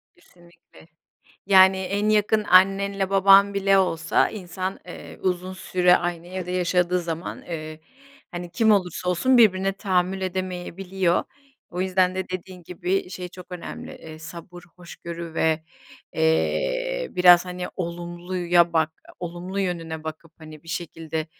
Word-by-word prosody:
Kesinlikle, 175 -2 -21 0.6
yani, 190 -1 +7
en 200 +3 -1
yakın 215 0 +2
annenle 195 +1 +3
baban 195 +1 +6
bile 195 0 +3
olsa 165 -4 +2
insan, 185 -1 -5
eee, 175 - -10
uzun 185 0 -2
süre 180 -1 +3
aynı 175 -1 -4
evde 180 0 -6
yaşadığı 180 0 +1
zaman, 170 0 -5
eee, 155 -2 -7 0.5
hani, 175 -1 -7
kim 220 +3 +2
olursa 180 -2 0
olsun 250 +9 +3
birbirine 195 -3 +4
tahammül 190 -1 0
edemeyebiliyor. 185 0 -2 0.5
O 180 +1 -4
yüzden 185 -1 +2
de 190 0 -4
dediğin 185 0 -7
gibi, 180 +2 -2
şey 180 -1 -6
çok 180 0 -12
önemli, 180 - -7
eee, 155 -1 -11
sabır, 170 +2 -10
hoşgörü 170 -1 -8
ve, 160 -1 +1 0.5
eee, - - 0
biraz, 180 -1 +6
hani, 180 0 -5
olumluya 175 0 0
bak 160 -1 +2 0.3
olumlu 180 +3 -5
yönüne 165 -4 -4
bakıp, 160 +1 -8
hani, 155 -2 -12
bir 165 - -17
şekilde 160 -1 -4
180 Hz, 130 wpm, -24 LUFS, 170-190 Hz, 0.6 s, yani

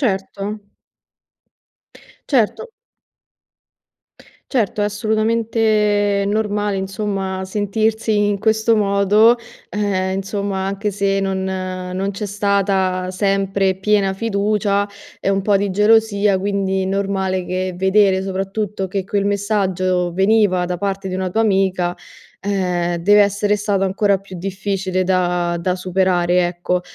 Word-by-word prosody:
Certo. 195 -6 -2 1.9
Certo. 275 - +1 1.8
Certo, 215 -5 0
è - - +2
assolutamente 215 -1 +1
normale 210 -1 0
insomma, 195 -1 -3
sentirsi 215 +2 0
in 205 -1 -1
questo 220 +1 +2
modo. 210 +3 +4 0.3
Ehm, 190 -2 -1
insomma 195 -1 -3
anche 200 +2 -2
se, 195 0 0
non 190 -1 -1
non 185 0 -3
c'è 205 +2 -5
stata 195 -2 0
sempre 195 -1 0
piena 195 0 +1
fiducia 205 -1 0 0.3
e - - -1
un 195 0 +2
po' 200 +1 +2
di 200 0 -1
gelosia, 210 0 +3
quindi 195 -1 -1
normale 190 -1 -1
che 185 0 -2
vedere, 190 0 +3
soprattutto, 195 +1 -3
che 190 0 -3
quel 200 0 -1
messaggio 190 -3 0
veniva 195 -1 +3
da 180 0 -3
parte 195 0 -3
di 185 - -3
una 185 -1 -2
tua 225 +4 +1
amica, 190 -4 +1 0.4
ehm, 180 -3 -1
deve 205 +5 +4
essere 205 +1 +2
stato 200 -1 0
ancora 195 +1 +1
più 190 -1 -11
difficile 190 0 -2
da 180 -2 0
da 180 +1 -1
superare, 180 -1 +1
ecco. 180 +1 -2
195 Hz, 120 wpm, -19 LUFS, 190-205 Hz, 1.9 s, modo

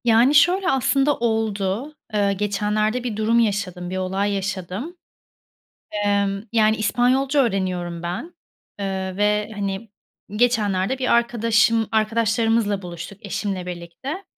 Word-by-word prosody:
Yani, 240 +4 +4
şöyle, 365 +5 +4
aslında 275 +1 +2
oldu. 220 +2 -1 0.2
Eee, 200 -1 +2
geçenlerde 210 +3 0
bir 230 -4 -3
durum 225 +2 +2
yaşadım, 195 -5 -1
bir 185 - -3
olay 190 +2 -1
yaşadım. 195 - -4 1.1
Emm, 200 -1 +1
yani, 220 -1 +4
İspanyolca 260 +6 +2
öğreniyorum 180 -5 -2
ben, 185 - -5 0.4
eee, 190 -2 -3
ve, 210 +1 +1
hani, 200 +1 -4 0.5
geçenlerde 215 -1 +1
bir 255 -1 -1
arkadaşım 230 -2 +3
arkadaşlarımızla 225 -1 +1
buluştuk 180 +3 -8
eşimle 195 -2 -3
birlikte. 180 - -6
210 Hz, 115 wpm, -22 LUFS, 195-235 Hz, 1.1 s, Yani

